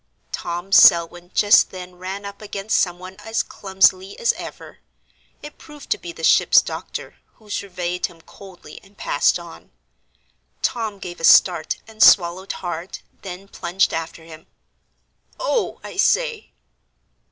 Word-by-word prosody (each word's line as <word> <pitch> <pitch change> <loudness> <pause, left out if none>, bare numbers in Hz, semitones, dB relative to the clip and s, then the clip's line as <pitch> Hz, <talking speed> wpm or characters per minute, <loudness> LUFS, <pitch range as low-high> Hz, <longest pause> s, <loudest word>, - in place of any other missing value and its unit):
Tom 175 +3 -5
Selwyn 175 -1 +5
just 205 0 +5
then 180 -1 -9
ran 190 +3 -7
up 200 +1 -9
against 205 0 -2
some 175 -2 0
one 185 +1 -11
as 225 +1 -2
clumsily 190 0 +1
as 470 - +1
ever. - - -10 0.6
It 295 0 -11
proved 295 -2 -14
to 420 - +1
be 350 - -8
the 340 - -12
ship's - - +5
doctor, - - -7 0.2
who 215 -3 -16
surveyed 180 -3 -3
him 170 -2 -18
coldly 180 -3 -14
and 195 +1 -22
passed - - +1
on. - - -13 0.9
Tom 220 -4 -2
gave 175 -2 -9
a - - -11
start 170 -1 +5
and 220 -1 -11
swallowed 180 +1 +5
hard, 175 +1 -5 0.2
then 190 0 -9
plunged 190 0 -1
after 165 0 -5
him. 160 -1 -14 0.9
"Oh, - - -1
I - - -9
say." 480 -3 +1
190 Hz, 140 wpm, -21 LUFS, 175-210 Hz, 0.9 s, Selwyn